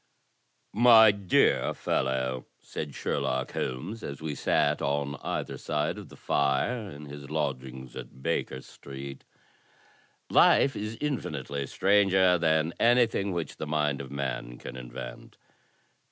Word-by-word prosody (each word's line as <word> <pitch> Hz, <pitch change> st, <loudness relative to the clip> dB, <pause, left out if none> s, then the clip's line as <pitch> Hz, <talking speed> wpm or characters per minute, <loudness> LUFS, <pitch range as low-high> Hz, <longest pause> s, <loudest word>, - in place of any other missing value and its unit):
"My 110 Hz, -1 st, +8 dB
dear 100 Hz, -3 st, +2 dB
fellow," 65 Hz, -1 st, -1 dB
said 75 Hz, -3 st, -6 dB
Sherlock 65 Hz, -2 st, -1 dB
Holmes, 85 Hz, -, -4 dB
as 70 Hz, -1 st, -6 dB
we 80 Hz, -1 st, -4 dB
sat 70 Hz, -, +1 dB
on 70 Hz, 0 st, -1 dB
either -, -, -3 dB
side 75 Hz, 0 st, -1 dB
of -, -, -11 dB
the -, -, -13 dB
fire 85 Hz, -, 0 dB
in 75 Hz, -3 st, -10 dB
his 70 Hz, -1 st, -9 dB
lodgings 65 Hz, -4 st, -4 dB
at 65 Hz, -, -10 dB
Baker 75 Hz, -5 st, -1 dB
Street, 70 Hz, 0 st, -10 dB, 1.1 s
"life 140 Hz, -, +5 dB
is 105 Hz, +2 st, -4 dB
infinitely 70 Hz, -, -3 dB
stranger 95 Hz, -1 st, +4 dB
than 80 Hz, 0 st, +2 dB
anjrthing 115 Hz, -4 st, +3 dB
which 85 Hz, -2 st, -4 dB
the 75 Hz, -, -5 dB
mind 75 Hz, -2 st, 0 dB
of 65 Hz, -, -8 dB
man 65 Hz, -3 st, -4 dB
can -, -, -8 dB
invent. -, -, -9 dB
75 Hz, 125 wpm, -28 LUFS, 65-95 Hz, 1.1 s, My